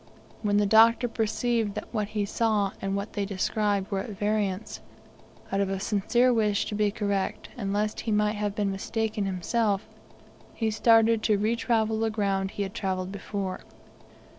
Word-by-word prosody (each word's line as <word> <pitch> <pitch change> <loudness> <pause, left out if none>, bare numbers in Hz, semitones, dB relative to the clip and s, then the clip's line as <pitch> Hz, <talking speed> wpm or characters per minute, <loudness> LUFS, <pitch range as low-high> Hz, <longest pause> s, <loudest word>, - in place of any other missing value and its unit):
When 205 -1 +1
the 205 - +3
Doctor 225 +4 +5
perceived 225 -1 -1
that 210 - -7
what 210 -2 -1
he 210 -1 -2
saw 210 -2 +1
and 195 0 -1
what 200 +2 -4
they 205 - -1
described 200 +1 -1
were 195 - 0
at 195 - -5
variance, 205 -1 -1 0.7
out 195 - +1
of 195 - 0
a 195 0 -2
sincere 235 +5 +2
wish 210 -3 +1
to - - -5
be 210 0 +2
correct, 200 -2 -2
and 200 -5 -3
lest 210 +1 -1
he 225 - -3
might 210 0 +2
have 205 -1 -2
been 205 -2 0
mistaken 215 +1 -2
himself, 200 +2 0 0.7
he 225 -2 0
started 225 0 +4
to 215 -1 +2
retravel 220 0 +1
the 225 0 +1
ground 195 -3 0
he 200 - -3
had 195 0 -5
travelled 185 -1 -2
before. 195 -1 -4
210 Hz, 170 wpm, -27 LUFS, 200-220 Hz, 0.7 s, Doctor